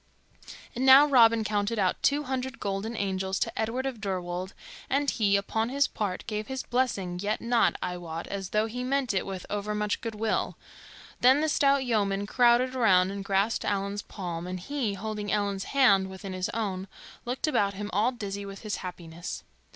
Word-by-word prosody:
And 250 - -2
now 265 +2 +9
Robin 230 -5 +5
counted 210 +1 -1
out 190 -3 +1
two 290 +1 +2
hundred 260 0 -4
golden 205 +3 -3
angels 190 -1 -1
to - - -1
Edward 235 +4 -2
of 255 -5 -4
Deirwold, 185 -1 -3 0.4
and 280 +2 +1
he, 200 -3 +2
upon 220 +3 -1
his 280 +2 +2
part, 195 -4 -3
gave 215 -1 -4
his 265 -1 -4
blessing, 200 -8 -1
yet 210 +2 -1
not, 235 0 +2
I 180 - -3
wot, 165 -1 -6
as 195 -2 -5
though 215 +1 +1
he 245 +3 -4
meant 265 -2 0
it 190 - -1
with 190 -2 -5
overmuch 210 0 -1
good 225 -2 -4
will. 220 +1 -1 0.6
Then 260 +3 +6
the 315 - +1
stout 275 -2 +3
yeomen 200 -4 0
crowded 245 +3 +3
around 190 -6 +4
and 200 0 -5
grasped 195 +3 +1
Allan's 200 0 -1
palm, 175 -4 -6
and 185 0 -4
he, 230 0 -2
holding 210 +1 -4
Ellen's 200 -2 -1
hand 200 -9 +4
within 190 0 -7
his 185 0 -2
own, 195 -4 -3 0.4
looked 245 +2 -2
about 200 -10 +1
him 205 +1 -5
all 215 +6 +3
dizzy 200 -5 -5
with 195 0 -8
his 215 -2 -3
happiness. 175 -2 -7
210 Hz, 180 wpm, -28 LUFS, 195-245 Hz, 0.6 s, now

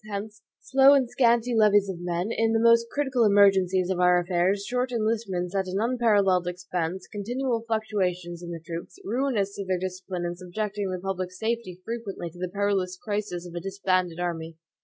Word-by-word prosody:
Hence, 210 +1 -6 0.2
slow 270 +1 +5
and 265 -3 +2
scanty 240 -1 +2
levies 205 -2 +4
of 190 -3 -5
men, 175 +4 -2
in 225 0 +1
the 225 - +3
most 230 0 +5
critical 265 -4 +1
emergencies 190 -3 +4
of 180 - -1
our 180 0 +5
affairs; 180 +3 0
short 250 +2 -1
enlistments 215 -6 -1
at 190 -1 0
an 185 +1 -2
unparalleled 210 -6 +2
expense; 180 0 -3
continual 235 +3 -2
fluctuations 180 -6 -2
in 175 - -7
the 170 -1 -5
troops, 170 +1 -7
ruinous 220 -3 0
to 200 - -3
their 185 -1 0
discipline 185 -1 -4
and 175 0 -4
subjecting 200 +2 -3
the 185 - -2
public 185 -1 -3
safety 220 -2 -3
frequently 215 -7 -5
to 175 - -15
the 180 0 -3
perilous 195 -2 -1
crisis 205 -5 -4
of 175 - -9
a 175 - -3
disbanded 185 -2 -1
army. 165 -2 -4
195 Hz, 180 wpm, -26 LUFS, 180-225 Hz, 0.2 s, slow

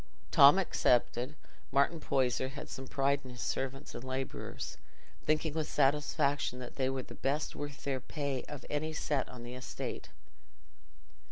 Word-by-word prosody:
Tom 145 +5 +9
excepted, 125 -6 +2 0.4
Martin 140 +5 +3
Poyser 130 -3 +1
had 145 +2 -8
some 135 0 -6
pride 140 +1 +2
in 130 - -9
his 125 -1 -7
servants 135 +1 -2
and - - -6
labourers, 130 0 -4 0.5
thinking 155 0 +2
with 155 -1 -1
satisfaction 145 -1 +2
that 125 -1 -7
they 130 -1 +1
were 135 -1 -2
the - - -10
best 145 +3 -1
worth 145 -1 -6
their 135 -2 0
pay 140 -1 -2
of 145 -2 -8
any 155 +2 -1
set 145 -2 0
on 120 -1 -9
the 120 +1 -7
estate. 125 0 -5
135 Hz, 155 wpm, -33 LUFS, 130-145 Hz, 0.5 s, Tom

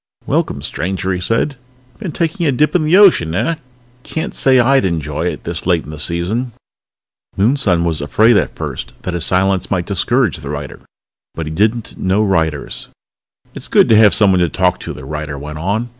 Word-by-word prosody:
"Welcome, - - -1
stranger," 95 +1 -2
he 90 - -2
said. 115 +9 -1 0.4
"Been 195 -6 -5
taking 165 +2 -1
a - - +3
dip 150 +4 +1
in 165 -4 +2
the 165 +5 +4
ocean, 165 - +5
eh? 165 - 0 0.4
Can't 160 +5 -4
say 130 -1 +4
I'd 135 +1 +4
enjoy 80 -5 -2
it, - - -4
this 85 +1 -4
late 85 -3 +2
in - - -10
the 75 - -8
season!" 95 +10 -1 0.8
Moonson 100 -5 +2
was 80 -3 -1
afraid 110 +10 +3
at - - 0
first - - -6
that 90 - -3
his 85 -1 -2
silence 95 0 +1
might 90 -3 -1
discourage 115 - 0
the 70 - -8
writer, 75 -1 -6 0.6
but 80 - -4
he 75 - -5
did 105 +7 +2
not 115 - -9
know 95 +3 +1
writers... 80 -7 -1 0.7
"It's - - -8
good - - +4
to 110 - +6
have 105 -1 +6
someone 95 -4 +4
to 85 -1 +2
talk 90 0 0
to," - - -6
the 65 - -10
writer 75 0 -5
went 75 +2 -7
on. 105 +8 -2
95 Hz, 195 wpm, -16 LUFS, 85-120 Hz, 0.8 s, to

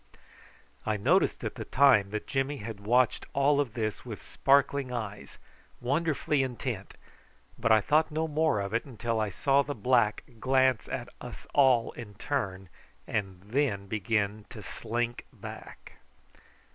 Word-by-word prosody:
I 110 -1 0
noticed 100 - +2
at - - -3
the - - -6
time 125 -8 +4
that 105 +1 -4
Jimmy 135 +1 -1
had 110 -2 -7
watched 120 +4 +2
all 145 +1 +3
this 115 -5 -4
with - - -7
sparkling 140 -1 +2
eyes, 105 -4 -6 0.4
wonderfully 150 +2 +1
intent, 120 -5 -4 0.6
but - - 0
I 110 -1 +6
thought 155 +7 +3
no 160 +1 -1
more 155 -7 +1
of 100 +1 -4
it 115 - +1
till 115 0 -1
I 110 -1 0
saw 135 +8 +3
the 145 +1 -4
black 120 -2 +2 0.2
glance 130 -1 +2
at - - -4
us - - -9
all 130 -5 +4
in 105 -4 -10
turn, 95 -7 -3 0.4
and 95 -4 -3
then 110 -4 0
begin 105 +1 -1
to 110 -4 -10
slink 120 +1 -3
back. - - -11
120 Hz, 145 wpm, -29 LUFS, 105-140 Hz, 0.6 s, I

